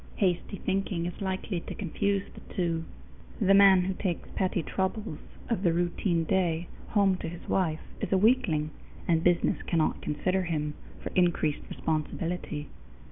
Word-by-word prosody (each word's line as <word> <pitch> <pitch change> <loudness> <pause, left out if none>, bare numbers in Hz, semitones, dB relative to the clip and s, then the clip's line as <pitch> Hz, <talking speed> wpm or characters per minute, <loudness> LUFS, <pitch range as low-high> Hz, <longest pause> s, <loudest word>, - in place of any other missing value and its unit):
Hasty 190 +1 0
thinking 190 -3 -1
is 175 +2 -5
likely 190 -1 -2
to - - -7
confuse 200 +1 0
the - - -13
two. 165 -3 0 0.5
The 195 -2 +5
man 195 -2 +8
who 190 +1 -1
takes 185 -2 -2
petty 185 -3 0
troubles 190 0 -2 0.3
of 230 -6 0
the 175 -4 +3
routine 175 0 +1
day 170 -1 +1 0.2
home 200 -3 +3
to - - -4
his 170 0 -9
wife 165 -5 +1 0.2
is - - -3
a 190 - +5
weakling, 185 -9 +3 0.4
and 165 -1 +3
business 175 -1 +3
cannot 165 -3 +1
consider 185 +5 0
him 150 -4 -1 0.3
for - - -4
increased 170 -4 +2
responsibility. 155 -1 -2
180 Hz, 150 wpm, -29 LUFS, 165-195 Hz, 0.5 s, man